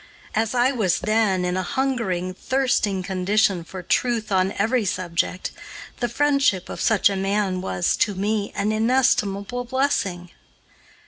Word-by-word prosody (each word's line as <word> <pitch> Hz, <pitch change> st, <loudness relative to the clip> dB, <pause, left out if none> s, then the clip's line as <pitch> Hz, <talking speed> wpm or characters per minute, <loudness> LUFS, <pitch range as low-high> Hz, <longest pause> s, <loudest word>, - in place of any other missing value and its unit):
As 220 Hz, +2 st, 0 dB
I 245 Hz, +2 st, +3 dB
was 215 Hz, -10 st, 0 dB
then 210 Hz, -4 st, +1 dB
in 180 Hz, 0 st, -1 dB
a 185 Hz, -, 0 dB
hungering, 190 Hz, -6 st, -1 dB
thirsting 230 Hz, -4 st, 0 dB
condition 190 Hz, 0 st, +1 dB
for 185 Hz, +2 st, -9 dB
truth 225 Hz, +2 st, 0 dB
on 190 Hz, 0 st, +2 dB
every 225 Hz, +4 st, +1 dB
subject, 180 Hz, -1 st, -2 dB, 0.5 s
the 240 Hz, -, -1 dB
friendship 275 Hz, -8 st, +1 dB
of -, -, -6 dB
such 220 Hz, -3 st, +4 dB
a 200 Hz, -, 0 dB
man 195 Hz, -1 st, 0 dB
was, 175 Hz, -1 st, 0 dB
to 205 Hz, -, +1 dB
me, 205 Hz, +2 st, -1 dB
an 210 Hz, -, 0 dB
inestimable 225 Hz, -1 st, +1 dB
blessing. 220 Hz, -10 st, -1 dB
205 Hz, 140 wpm, -23 LUFS, 185-240 Hz, 0.5 s, such